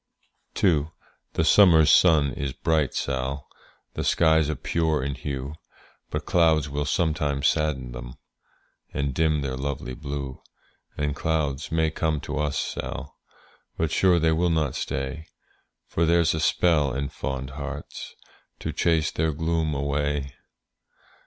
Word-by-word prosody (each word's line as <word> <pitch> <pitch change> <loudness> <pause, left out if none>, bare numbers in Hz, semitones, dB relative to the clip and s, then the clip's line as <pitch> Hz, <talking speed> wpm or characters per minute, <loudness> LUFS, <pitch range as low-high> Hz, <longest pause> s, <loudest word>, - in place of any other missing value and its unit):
II. 80 -6 +3 0.5
The 80 - +1
summer's 80 -3 +6
sun 75 -6 +5
is 70 0 -3
bright, 75 0 0
Sall, 65 +1 -2 0.5
The - - -3
skies 80 -2 +3
are 80 - -1
pure 80 +1 0
in 70 +1 -2
hue; 70 +1 -5 0.6
But - - -4
clouds 80 -4 +3
will 70 +1 -2
sometimes 75 -2 +1
sadden 70 -5 0
them, 65 0 -8 0.8
And 70 -1 -1
dim 80 0 +1
their 65 -2 -3
lovely 65 -2 -4
blue; 70 -2 -6 0.6
And 75 -1 -1
clouds 75 -4 -1
may 80 -1 +1
come 80 -1 -1
to - - -4
us, 75 -2 -1
Sall, - - -4 0.6
But 80 -2 0
sure 90 0 +4
they 80 -1 +3
will 85 +2 +2
not 80 -5 +1
stay; 70 +4 -4 0.6
For 85 0 0
there's 85 0 +3
a 80 - -2
spell 75 -3 +2
in 70 0 -2
fond 65 -1 -4
hearts 75 +1 -7 0.5
To 80 - -3
chase 80 0 +1
their 80 0 0
gloom 80 0 -1
away. 70 -1 -1
75 Hz, 140 wpm, -25 LUFS, 70-80 Hz, 0.8 s, summer's